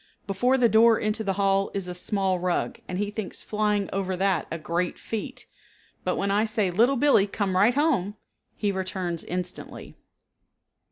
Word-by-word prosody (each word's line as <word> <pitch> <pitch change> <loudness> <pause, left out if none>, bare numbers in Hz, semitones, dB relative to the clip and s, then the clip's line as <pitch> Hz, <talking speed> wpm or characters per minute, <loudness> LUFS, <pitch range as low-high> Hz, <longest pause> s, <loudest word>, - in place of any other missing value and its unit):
Before 245 +7 +2
the 245 -2 +5
door 225 0 +5
into 215 +1 -1
the 195 -2 0
hall 195 0 +2
is 195 -2 -3
a 180 - -4
small 190 0 0
rug 180 0 -1
and 180 - -4
he 205 +1 -1
thinks 210 -2 -5
flying 210 -2 0
over 190 -1 -2
that 190 -3 +1
a 165 - -3
great 170 +2 -2
feat, 220 -2 -5 0.6
but - - 0
when 200 0 -1
I 205 +2 +3
say, 215 -4 0
"Little 235 +9 +3
Billee, 255 -7 +4
come 200 -2 -2
right 210 +7 +4
home," 260 - +1 0.4
he 205 -2 0
returns 185 -3 -3
instantly. 180 0 -6
200 Hz, 170 wpm, -26 LUFS, 185-215 Hz, 0.6 s, the